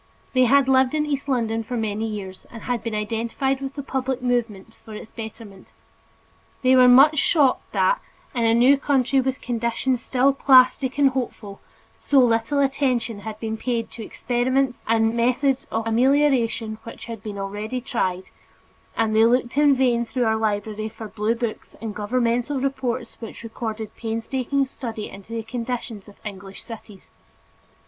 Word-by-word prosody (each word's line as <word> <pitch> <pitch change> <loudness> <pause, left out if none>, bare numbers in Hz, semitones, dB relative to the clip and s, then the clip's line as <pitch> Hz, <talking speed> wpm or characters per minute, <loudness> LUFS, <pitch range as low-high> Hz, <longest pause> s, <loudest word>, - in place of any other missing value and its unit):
They 255 -1 +4
had 275 +2 +4
lived 260 +1 +3
in 300 -1 +1
East 285 -1 -3
London 225 -3 0
for 245 +2 -5
many 220 0 -2
years, 195 -3 -7
and 230 -2 -10
had 245 -2 -2
been 230 -2 -3
identified 230 +5 -1
with 270 0 -5
the 280 - -5
public 265 -1 -2
movements 230 -4 -2
for 220 - -11
its 215 - -10
betterment. 220 -3 -10 1.0
They 255 0 +5
were 255 -1 +7
much 275 +4 +7
shocked 285 -5 +2
that, - - +2 0.3
in 240 -3 -1
a 225 0 +4
new 255 +4 +5
country 270 -1 +2
with 260 0 -3
conditions 240 +1 -1
still 265 +2 +2
plastic 260 0 +4
and 280 -2 +4
hopeful, 230 -6 -5 0.4
so 285 - +1
little 230 +1 +3
attention 255 -5 0
had 215 +1 -7
been 220 0 -3
paid 235 -1 -2
to 225 - -8
experiments 250 +3 -1
and 225 0 +2
methods 255 +3 +1
of 225 0 -2
amelioration 230 -3 +2
which 230 - -10
had 230 -3 -7
already 205 +1 -5
been 250 - -5
tried; 190 -9 -1 0.7
and 220 -1 +1
they 220 - +6
looked 240 +1 +1
in 290 -1 +5
vain 245 -2 +2
through 245 +1 -1
our 220 0 +2
library 215 0 -2
for 220 0 -9
blue 220 +2 -1
books 235 -2 -5
and 225 -2 -5
governmental 240 +5 0
reports 255 -2 -3
which 230 0 -9
recorded 220 -1 -5
painstaking 250 +4 -1
study 230 -5 -6
into 195 +3 -13
the 230 -1 -3
conditions 230 -2 -5
of 205 - -14
English 195 -1 -8
cities. 215 -4 -11
235 Hz, 165 wpm, -23 LUFS, 220-260 Hz, 1.0 s, were